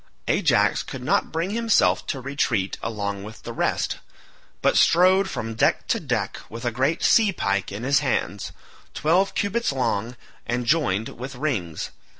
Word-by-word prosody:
Ajax - - +3
could - - -8
not - - +1
bring 165 +4 -2
himself 230 0 +2
to 135 - -2
retreat 125 -7 -1
along 100 -3 -3
with 110 +2 -10
the - - -6
rest, - - -1 0.6
but - - +3
strode 185 +3 +5
from 115 0 -4
deck 110 - +1
to - - +2
deck - - -2
with 115 +2 -7
a 120 - +1
great 135 +8 0
sea 220 -3 +5
pike 100 - -1
in 100 +4 -6
his 140 +2 +3
hands 120 -7 -2 0.4
twelve 180 +6 +2
cubits 215 +1 0
long 125 -3 -1 0.3
and 120 +1 -1
jointed 115 - 0
with 130 +2 -6
rings. 115 - -3
130 Hz, 155 wpm, -24 LUFS, 110-165 Hz, 0.6 s, strode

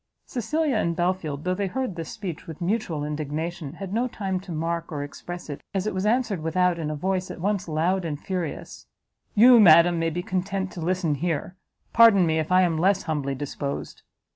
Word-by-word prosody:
Cecilia 290 +2 -1
and 170 -5 0
Belfield, 175 -5 -1
though 180 - 0
they 200 +1 -1
heard 250 0 -3
this 165 -1 -6
speech 185 -7 -6
with 160 -2 -8
mutual 175 -5 -1
indignation, 155 +1 -4
had 195 +2 -7
no 240 +3 +1
time 195 -6 -3
to 185 -1 -10
mark 165 +1 -3
or 145 -2 -3
express 175 +5 -8
it, 145 -2 -6
as 190 0 0
it 215 - -1
was 190 +2 -1
answered 225 -6 +1
without 175 +2 +1
in 155 -2 -2
a 155 - -3
voice 185 +4 -1
at - - -7
once 200 +1 -1
loud 170 +4 0
and 150 -3 -3
furious, 180 -4 -5 0.5
"You, 240 +3 +8
madam, 170 -2 +7
may 165 0 +1
be 175 +2 -4
content 190 +1 -2
to 175 - -7
listen 175 -2 0
here; 165 +3 -2 0.4
pardon 225 -5 +7
me 160 -1 +1
if 155 +2 -3
I 185 0 +6
am 165 -3 +1
less 190 +3 +2
humbly 140 -3 -2
disposed!" 140 0 -5
175 Hz, 200 wpm, -25 LUFS, 160-195 Hz, 0.5 s, You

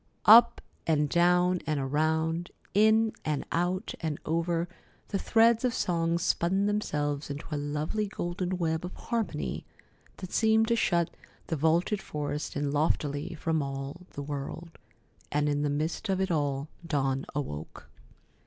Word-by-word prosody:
Up 235 +2 +8 0.3
and 150 -2 +3
down 180 +1 +3
and 155 -2 0
around, 160 +5 0 0.2
in 220 +2 +4
and 150 -3 -1
out 180 +4 -1
and 155 -3 -2
over, 170 +1 0 0.4
the 200 - -1
threads 230 +3 +4
of 250 -2 +1
song 170 -1 +1
spun 180 +3 +1
themselves 150 -9 -1
into 145 +2 -5
a - - 0
lovely 150 +9 -2
golden 180 -1 -3
web 160 -2 -1
of 180 - -6
harmony 210 - -3 0.5
that 185 -2 -8
seemed 220 0 +3
to 235 - +4
shut 170 -6 +1 0.3
the 165 - -2
vaulted 165 +7 +1
forest 150 0 -4
in 145 -1 -1
loftily 145 +2 0
from 160 0 0
all 140 +5 -5
the 145 - -5
world, 145 +4 -6 0.5
and 145 0 +1
in 145 0 +1
the 145 - +1
midst 155 +8 -2
of 190 -1 +1
it 190 -1 0
all 145 -2 0 0.2
Dawn 135 -3 0
awoke. 80 - -5
165 Hz, 145 wpm, -29 LUFS, 145-185 Hz, 0.5 s, Up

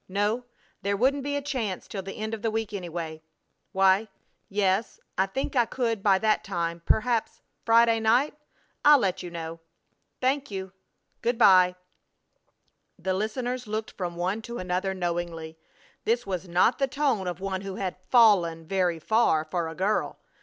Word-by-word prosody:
No, 205 +5 0 0.4
there 200 0 0
wouldn't 270 +5 +2
be 285 +1 -2
a 285 - -2
chance 240 -10 -3
till 195 - -5
the 195 +1 -8
end 220 +1 -4
of 220 - -4
the 225 - 0
week, 220 -1 -3
anyway.... 170 -4 -5 0.5
Why, 195 +2 +3 0.4
yes, 195 +1 0 0.2
I 190 +1 +2
think 270 +7 -3
I 240 -2 +4
could 230 -4 -1
by 195 -1 +4
that 215 +1 +1
time, 170 -3 -3
perhaps 230 0 +1 0.3
Friday 230 0 +5
night? 240 +7 +2 0.5
I'll 295 0 +8
let 195 -7 0
you 180 - -6
know.... 165 -1 -6 0.6
Thank 270 +2 0
you. 190 -2 -6 0.5
Good 240 +1 0
by!" 185 -5 +6 1.2
The 185 +1 -1
listeners 245 +5 -2
looked 215 +1 -3
from 175 -3 -5
one 185 +5 -1
to 235 +2 -7
the 180 -3 -3
other 190 +1 -1
knowingly. 170 -3 -4 0.4
This 235 +2 +1
was 185 -2 -4
not 180 +9 +3
the 275 - +2
tone 265 -9 0
of 175 0 -4
one 190 -1 -3
who 195 -1 -6
had 190 -2 -3
"fallen" 180 -9 +4
very 180 -1 +1
far 160 -3 +2
for 165 +1 -2
a 160 - -7
girl. 195 +5 0
195 Hz, 165 wpm, -27 LUFS, 180-230 Hz, 1.2 s, I'll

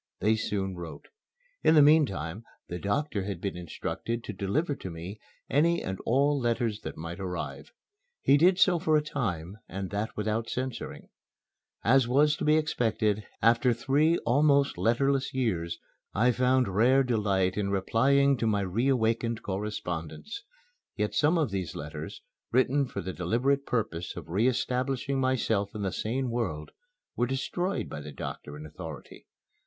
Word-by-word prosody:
They 110 +3 +3
soon 100 -3 -2
wrote. 85 -2 -9 0.5
In 160 - +5
the 150 - +8
meantime 110 - +3 0.3
the 90 - -4
doctor 115 - -1
had 100 -1 -4
been 100 - -3
instructed 100 +7 -4
to 105 - -5
deliver 120 - -1
to 95 - -7
me 85 +5 -7 0.3
any 170 +4 +2
and 95 0 -4
all 140 +4 +3
letters 115 -3 0
that - - -7
might 85 +3 -6
arrive. 90 -2 -5 0.5
He 140 - +4
did 180 +5 +5
so 180 -2 +4
for 155 -1 +3
a 150 - +1
time, 100 - -3
and 95 +1 -5
that 105 +2 -3
without 110 +2 -1
censoring. 130 -1 -5 0.7
As 125 +2 +4
was 145 +4 +4
to - - -4
be 155 +1 +4
expected, 110 -8 0 0.2
after 115 +3 +4
nearly 120 -1 0
three 150 +6 +3
almost 140 +2 +3
letterless 135 +4 +1
years, 90 -10 -1 0.4
I 120 +5 +4
found 125 0 +2
rare 130 +6 +5
delight 100 -6 +1
in 100 -1 -1
replying 135 +8 +3
to 115 - 0
my 105 -2 +2
reawakened 115 +2 0
correspondents. 95 - -4 0.5
Yet - - -1
some 155 +3 +3
of 150 -9 +1
these 95 -4 -3
letters, 75 +1 -7 0.3
written 130 +3 +3
for 100 - -5
the 95 +1 -5
deliberate 125 +11 0
purpose 95 -8 -2
of - - -8
re 100 +8 +2
establishing 130 +1 0
myself 115 -6 0
in 105 - -3
the 95 - -1
sane 125 +6 -2
world, 90 -11 -3 0.4
were 120 - +1
destroyed 175 +9 -2
by 75 - -6
the 75 0 -8
doctor 75 +1 -7
in 75 - -9
authority. 75 -1 -9
115 Hz, 160 wpm, -28 LUFS, 95-135 Hz, 0.7 s, the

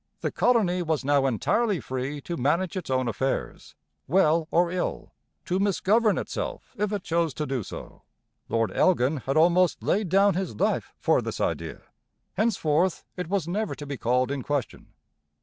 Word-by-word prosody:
The - - -1
colony 200 -8 +2
was 160 -5 -1
now 140 -1 +3
entirely 200 - +1
free 130 +3 -4
to 170 - -4
manage 165 +7 0
its 185 - -5
own 130 -1 +1
affairs, 130 +4 -3 0.3
well 160 -1 +3
or 170 0 +2
ill, 180 0 -3 0.3
to 185 +1 0
misgovern 205 +2 +2
itself - - -5
if 210 -2 -1
it 205 -2 -2
chose 165 -4 0
to 150 - -2
do 135 -3 -2
so. - - -9 0.5
Lord 115 -1 +1
Elgin 155 -5 +2
had 135 +2 -2
almost 175 +2 +3
laid 200 -2 +1
down 195 +3 +4
his 180 - -3
life - - 0
for - - +2
this - - -5
idea; - - -2 0.5
henceforth 180 -5 +1
it 180 - -4
was 190 -5 0
never 210 +4 -2
to 145 - -8
be 140 0 -4
called 125 +3 +1
in 140 -1 -2
question. 145 +1 -3
170 Hz, 165 wpm, -26 LUFS, 140-190 Hz, 0.5 s, down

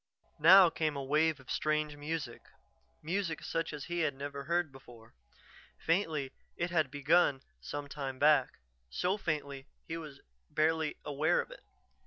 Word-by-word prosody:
Now 180 +3 +8
came 155 -2 -1
a 140 - -3
wave 150 +2 +2
of 135 - -10
strange 155 -1 0
music, 145 -4 -5 0.6
music 170 0 -2
such 165 0 -2
as 150 -2 -6
he 175 0 -3
had 155 -4 0
never 140 0 -6
heard 170 -1 0
before. 120 -4 -15 0.6
Faintly 160 -6 0 0.3
it 175 0 -2
had 155 -5 +2
begun 145 -1 +2 0.2
some 145 0 -5
time 135 -2 -5
back, 145 -2 +3 0.3
so 180 - 0
faintly 145 -7 -4 0.2
he 165 - -4
was 150 -4 -9 0.3
barely 160 0 +1
aware 150 +4 +1
of - - -4
it. - - -12
150 Hz, 150 wpm, -32 LUFS, 140-165 Hz, 0.6 s, Now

